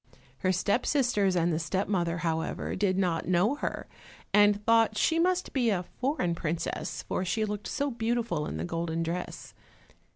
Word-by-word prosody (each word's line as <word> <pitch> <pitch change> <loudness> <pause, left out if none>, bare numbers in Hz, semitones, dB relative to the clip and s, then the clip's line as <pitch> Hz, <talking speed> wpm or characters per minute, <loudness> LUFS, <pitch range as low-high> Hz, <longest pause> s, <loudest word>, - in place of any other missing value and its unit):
Her 185 - +2
step 200 +6 +1
sisters 220 -9 +2
and 170 -1 +2
the 155 - 0
step 185 +4 -1
mother 175 -4 0
however 160 0 -2
did 190 -1 +1
not 175 -4 0
know 185 +7 +3
her, - - -4 0.5
and 205 0 +4
thought 225 -1 +4
she 325 +9 +2
must 365 +1 +1
be 245 -4 +2
a 185 -4 0
foreign 250 - -1
princess, 165 0 -3
for - - -2
she 215 +4 0
looked 210 -1 -4
so 285 0 -1
beautiful 230 -9 -1
in - - -4
the 80 - -3
golden 165 - -2
dress. 170 +2 -5
195 Hz, 170 wpm, -29 LUFS, 170-230 Hz, 0.5 s, and